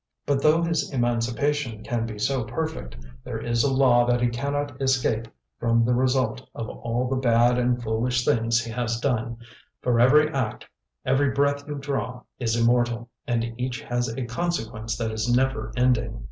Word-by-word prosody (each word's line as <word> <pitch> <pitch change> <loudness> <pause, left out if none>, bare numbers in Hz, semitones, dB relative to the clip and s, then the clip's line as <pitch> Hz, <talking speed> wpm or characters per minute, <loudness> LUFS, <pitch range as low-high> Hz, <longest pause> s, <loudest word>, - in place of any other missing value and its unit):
But 140 -1 +1
though 155 +3 +4
his 165 -3 0
emancipation 120 0 0
can 115 -1 -2
be 110 -2 -7
so 130 +4 0
perfect, 120 - -4 0.3
there - - -5
is 120 0 0
a 140 - +2
law 130 -2 +5
that 120 0 +3
he 120 0 +2
cannot 140 +2 -3
escape 125 -4 +1 0.3
from 115 -1 +3
the 125 - +2
result 130 +1 0
of 115 - -4
all 120 +2 -2
the 130 +1 -1
bad 120 -1 +3
and 125 0 +1
foolish 120 +2 0
things 115 +1 +2
he 115 - -6
has 115 -1 -2
done, 120 -2 -1 0.4
for 120 -2 +1
every 150 +5 +6
act, 130 -7 -3 0.4
every 135 +2 +3
breath 140 +1 0
you 150 - -4
draw, 125 -4 -3 0.2
is 115 -2 0
immortal, 120 0 +1 0.2
and 115 -2 -1
each 125 -1 -2
has 120 0 -1
a 120 +2 -3
consequence 115 -5 -3
that 110 -1 -2
is 110 +2 -1
never 130 +3 +1
ending. 125 -1 +1
120 Hz, 175 wpm, -25 LUFS, 115-135 Hz, 0.4 s, every